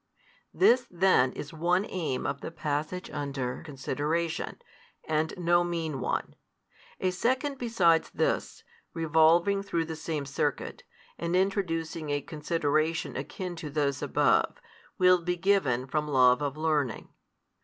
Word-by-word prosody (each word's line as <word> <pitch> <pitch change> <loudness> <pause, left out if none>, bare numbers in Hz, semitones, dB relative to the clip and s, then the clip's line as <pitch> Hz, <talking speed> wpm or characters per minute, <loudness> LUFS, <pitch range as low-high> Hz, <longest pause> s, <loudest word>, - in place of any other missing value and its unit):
This 250 -8 +4
then 175 -8 +3
is 150 - -7
one 175 +5 +1
aim 160 -8 -3
of 140 0 -3
the - - -5
passage 155 +2 -3
under 140 -4 -3
consideration, 150 +3 -3 0.5
and 155 0 0
no 175 0 +3
mean 165 -5 -3
one. - - -2 0.7
A 185 - +1
second 260 +8 -1
besides 185 -9 +3
this, - - -1 0.3
revolving 165 +5 +4
through 170 -4 -1
the 160 0 -5
same 155 -2 -3
circuit, 140 - -2 0.4
and 170 +1 -1
introducing 170 -5 -1
a 145 0 +1
consideration 155 +1 -1
akin 180 -2 -5
to 160 -2 -6
|176 - - -12
those 140 -3 0
above, - - +2 0.4
will 180 -1 +5
be 180 +1 -1
given 175 -10 +1
from 150 +3 -2
love 125 -2 +4
of 145 0 -2
learning. 150 -7 -1
160 Hz, 135 wpm, -28 LUFS, 145-180 Hz, 0.7 s, will